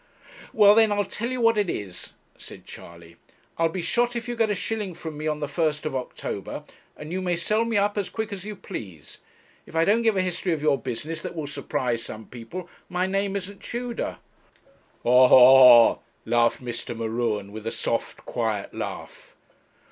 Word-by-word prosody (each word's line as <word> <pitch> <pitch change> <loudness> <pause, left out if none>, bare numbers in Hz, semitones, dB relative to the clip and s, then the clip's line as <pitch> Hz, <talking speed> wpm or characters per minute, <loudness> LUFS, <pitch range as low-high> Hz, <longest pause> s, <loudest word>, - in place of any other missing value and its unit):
'Well, 205 -2 +7
then, 220 -1 +4
I'll 205 0 +1
tell 230 +5 -4
you 255 0 -3
what 230 -2 +4
it 200 -4 0
is,' 95 - -6 0.2
said - - -12
Charley, 85 0 -13 0.4
'I'll 165 0 +3
be 175 +1 -4
shot 240 +4 +1
if 235 0 -4
you 240 - -3
get 225 -2 +1
a 210 - 0
shilling 205 -2 -4
from 160 -2 -7
me 155 +1 -4
on 150 -1 -2
the 145 - -1
1st 155 +1 -1
of 150 -3 -3
October, 130 -1 -5 0.3
and 150 +2 -8
you 185 +1 -2
may 180 -1 0
sell 215 +6 0
me 230 -2 0
up 205 +1 +1
as 200 - -3
quick 220 -1 -4
as 190 -2 -7
you 210 0 -6
please. 95 - -9 0.5
If - - -13
I 165 0 +3
don't 215 +5 +3
give 225 -3 +2
a - - +3
history 180 -1 -1
of 155 - -3
your 150 -3 +3
business 145 +6 -5
that - - -6
will 155 -2 -4
surprise 130 -4 -2
some 110 -1 -8
people, 125 +10 -8 0.2
my 180 +1 0
name 195 +1 -1
isn't 200 +1 -6
Tudor.' 240 -1 -4 0.9
'Ha, 125 +2 +6
ha, 125 -2 +9
ha!' - - -18 0.3
laughed 120 +2 +2
Mr. 120 -1 -5
M'Ruen, 110 -3 -2
with 110 +1 -7
a - - -1
soft - - -3
quiet - - -2
laugh. - - -7
165 Hz, 195 wpm, -25 LUFS, 125-205 Hz, 0.9 s, ha